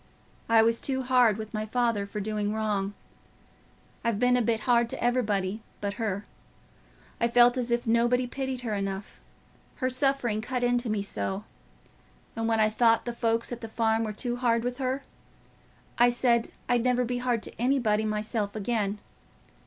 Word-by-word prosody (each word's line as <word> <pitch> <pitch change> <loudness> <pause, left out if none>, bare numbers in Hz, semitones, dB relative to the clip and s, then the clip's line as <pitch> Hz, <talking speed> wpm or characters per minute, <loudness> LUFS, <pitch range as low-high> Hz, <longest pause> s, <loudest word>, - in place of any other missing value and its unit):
I 225 -1 +6
was 230 +1 +2
too 265 -1 -1
hard 250 -4 +4
with 215 0 -7
my 215 0 -3
father, 230 -3 0
for 210 - -5
doing 210 0 -2
wrong. 205 -2 -1 1.1
I've 230 -3 0
been 250 +2 +3
a 250 - +3
bit 225 -1 0
hard 235 0 +3
t' - - -3
everybody 215 -4 0 0.2
but 200 -1 -2
her. 205 -2 -2 0.9
I 235 - +3
felt 240 +1 +5
as 250 -2 -2
if 235 0 0
nobody 240 +2 +2
pitied 265 0 -4
her 230 -3 -3
enough—her 195 +6 -6
suffering 255 -5 +1
cut 250 +2 -3
into 245 -1 +1
me 210 -2 -1
so; 195 0 -3 0.9
and 225 0 -1
when 225 -1 +2
I 215 - +5
thought 225 +1 +3
the 240 - -3
folks 230 0 0
at 240 - -5
the 225 - -5
farm 225 0 +1
were 215 - -2
too 240 +3 -3
hard 235 -2 +1
with 245 +2 -3
her, 265 +1 -1 1.0
I 240 0 +7
said 240 -1 +2 0.2
I'd 240 -1 +2
never 250 0 +2
be 245 +1 -2
hard 245 -3 0
to - - -9
anybody 240 -5 +2
myself 215 -1 -2
again. 210 -1 -1
230 Hz, 170 wpm, -27 LUFS, 215-245 Hz, 1.1 s, I